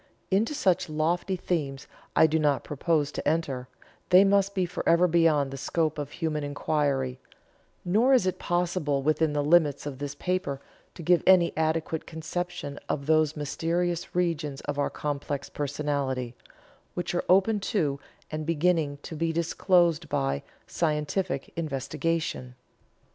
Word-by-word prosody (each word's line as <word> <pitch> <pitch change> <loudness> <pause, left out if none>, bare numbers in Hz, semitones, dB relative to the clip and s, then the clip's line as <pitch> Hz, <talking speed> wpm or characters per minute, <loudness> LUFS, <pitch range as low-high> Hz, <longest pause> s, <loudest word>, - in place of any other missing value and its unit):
Into 220 +10 +2
such 185 - +1
lofty 170 +5 0
themes 145 -7 -3 0.3
I - - +7
do 160 0 +2
not 145 -2 +2
propose 150 0 0
to - - -4
enter, 145 -5 -1 0.4
they 185 +1 +8
must 200 0 +2
be 185 -2 +1
forever 175 0 +2
beyond 160 -5 +3
the 135 - -6
scope 155 +1 -1
of 145 - -4
human 155 -3 -2
inquiry; 145 -3 -1 0.7
nor 220 +9 +3
is 255 -8 +5
it 185 -1 -1
possible 175 -5 0
within 155 +1 +2
the 145 -1 0
limits 150 -2 +3
of 140 -3 -6
this 145 0 -4
paper 180 -5 -2 0.4
to 170 - -8
give 175 +2 +4
any 185 -2 +5
adequate 160 0 -1
conception 160 -2 -5
of 140 - -2
those 155 0 +2
mysterious 170 +4 -2
regions 160 -6 -1
of 145 0 -4
our 145 - +1
complex 145 -1 -4
personality, 140 -4 -2 0.6
which 175 0 -3
are 175 - 0
open 195 +4 +4
to, 155 -8 -1 0.3
and 155 0 -3
beginning 165 -3 +1
to 160 - -7
be 165 +1 0
disclosed 170 -1 +2
by, 70 - 0 0.2
scientific 155 0 -2
investigation." 155 -3 -2
160 Hz, 145 wpm, -27 LUFS, 145-175 Hz, 0.7 s, they